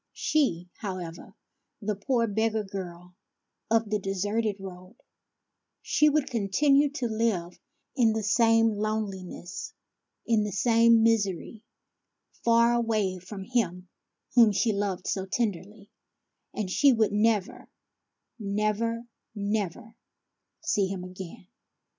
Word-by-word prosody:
She, 180 - 0
however, 180 -5 -7 0.4
the 210 -1 -2
poor 230 +4 +1
beggar 220 0 0
girl 180 -2 -8 0.6
of 225 -1 +2
the 210 - +1
deserted 205 +3 -1
road, 185 +2 -10 0.5
— - - -57
she 300 - +6
would 295 -1 +1
continue 275 +6 +3
to 265 -5 -2
live 215 -6 -1 0.4
in 235 -5 +4
the 220 0 -2
same 225 +1 +4
lone 215 -1 -1
liness, 185 -1 -8 0.5
in 225 -2 +2
the 210 - -3
same 230 +1 +4
misery, 215 -1 0 0.8
far 235 0 +4
away 215 -6 0
from 190 +2 -8
him 185 -6 -1 0.4
whom 230 -3 +7
she 215 +2 +1
loved 200 -2 -2
so 190 -1 -2
tenderly; 205 -1 -3 0.6
and 205 -4 -4
she 280 +7 +5
would 220 -2 +2
never, 210 -1 0 0.7
never, 215 +3 -1 0.3
never, 205 +1 -3 0.7
see 200 -2 +1
him 190 -1 -5
again. 185 -1 -9
210 Hz, 115 wpm, -27 LUFS, 190-230 Hz, 0.8 s, whom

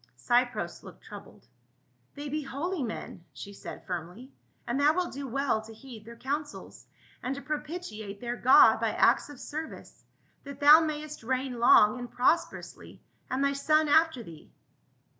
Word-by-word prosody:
Cypros 245 0 0
looked - - -14
troubled. - - -13 0.3
" - - -42
They 290 0 -6
be 305 +2 -3
holy 300 +5 -4
men," 220 -7 -6
she 200 - -9
said - - -10
firmly, 180 - -7 0.2
" - - -41
and 240 +3 -1
thou 300 +2 +4
wilt 360 -1 -2
do 275 0 -6
well 265 -3 0
to 220 0 -13
heed 225 -3 -12
their 235 +1 -11
counsels, 290 +5 -6 0.3
and 255 +2 -3
to 280 - -7
propitiate 290 - -6
their 240 +1 -4
God 255 +2 +6
by - - -1
acts - - +3
of 290 -4 -11
ser 310 +3 -5
vice, - - -14 0.4
that 280 -1 -10
thou 295 +2 +8
mayst 305 -1 -4
reign 255 +1 -3
long 230 0 +5
and 245 -1 -7
prosperously 325 +9 -1 0.3
and 265 +1 -1
thy 280 0 +2
son 305 +2 +2
after 315 -4 +3
thee." 160 -6 -14
270 Hz, 170 wpm, -28 LUFS, 235-300 Hz, 0.4 s, thou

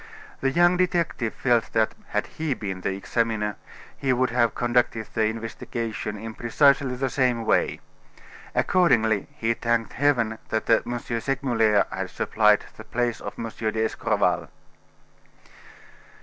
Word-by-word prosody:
The 135 - +1
young 175 +5 +4
detective 170 -10 0
felt 120 -3 +1
that, 110 -1 +2
had 105 - -1
he 155 -4 -3
been 95 -5 -5
the 95 - -1
examiner, 105 0 -1 0.4
he 135 - -1
would 130 0 +1
have 120 -2 +2
conducted 120 -2 +1
the 110 -1 +2
investigation 115 -1 -4
in 110 +2 -7
precisely 135 +3 +3
the 135 +2 -1
same 125 -3 +1
way. - - +1 0.7
Accordingly, 115 - +3
he 115 +1 +1
thanked 115 0 -1
heaven 120 -5 +1
that 110 -1 -1
M. 120 0 +2
Segmuller 115 -3 +1
had - - -4
supplied 105 -1 +2
the 110 - -9
place 120 +1 -2
of - - -6
M. 115 - -4
d'Escorval. 110 0 0
115 Hz, 130 wpm, -25 LUFS, 110-130 Hz, 0.7 s, young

